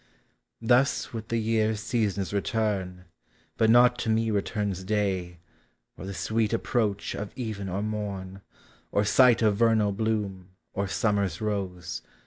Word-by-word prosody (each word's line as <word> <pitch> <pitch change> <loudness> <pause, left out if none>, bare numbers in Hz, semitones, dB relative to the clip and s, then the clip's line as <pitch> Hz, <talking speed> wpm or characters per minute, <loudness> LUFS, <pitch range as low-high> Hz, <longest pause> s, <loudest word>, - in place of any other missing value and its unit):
Tims 125 +2 +3
with 110 -1 -5
the 115 - -1
year 110 -1 +1
Seasons 105 -3 -1
return, 100 -3 -1 0.5
but 110 - +3
not 125 +1 +6
to 115 - -2
me 110 0 +2
returns 100 -2 -2
Day, 95 -4 -1 0.6
or 95 - -8
the 100 - -5
sweet 110 +1 0
approach 110 -3 -1
of 105 0 -5
even 110 -6 -4
or 95 +3 -2
morn, 100 -3 -4 0.5
Or 100 - +2
sight 120 +2 +5
of 105 -2 +3
vernal 110 -2 +3
bloom, 100 -3 -3 0.2
or 100 +1 -1
summer's 100 -4 0
rose. 95 -5 -3
105 Hz, 135 wpm, -27 LUFS, 95-110 Hz, 0.6 s, not